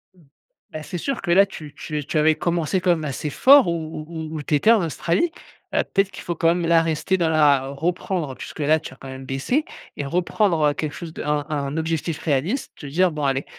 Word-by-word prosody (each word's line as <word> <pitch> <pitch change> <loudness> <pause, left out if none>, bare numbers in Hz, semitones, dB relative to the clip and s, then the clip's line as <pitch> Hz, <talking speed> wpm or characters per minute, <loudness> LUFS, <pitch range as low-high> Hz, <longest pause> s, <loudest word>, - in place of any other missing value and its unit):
Mmh. 175 - -22 0.5
Bah, 155 0 -6
c'est 175 - -5
sûr 270 +9 -3
que 175 -3 -2
là 195 +3 +6
tu 150 -6 -10
tu 155 -1 -5
es - - -4
tu 155 - -3
avais 155 0 +4
commencé 170 +2 0
quand 180 -1 +3
même 160 -2 0
assez 145 +2 -3
fort 270 - +6
où 160 -2 -3
où 160 -1 -5
où - - -5
où - - -4
tu 150 - +1
étais 215 +10 +4
en 215 -6 +4
Australie, 170 - 0 0.4
heu, - - +3
peut-être 195 -1 +2
qu'il - - -9
faut 175 - -3
quand 165 - +1
même 175 -1 -1
là 165 0 +5
rester 165 +3 0
dans 165 -2 +1
la 145 -4 +4
reprendre 160 0 -2
puisque 155 - -9
là, 155 +2 +3
tu 145 - -9
as - - -14
quand 135 0 -11
même 130 0 -8
baissé 140 - -1 0.3
et 145 - -3
reprendre, 175 +3 +1
heu, 145 - -1
quelque 150 -1 -4
chose 165 -2 -8
de - - -6
un 150 -1 0
un 145 -1 -2
objectif 160 0 -2
réaliste. 165 - -1
Te 145 - -11
dire: 175 +5 +2
«Bon, 150 -1 -3
allez», 135 0 0
160 Hz, 245 wpm, -22 LUFS, 145-175 Hz, 0.5 s, là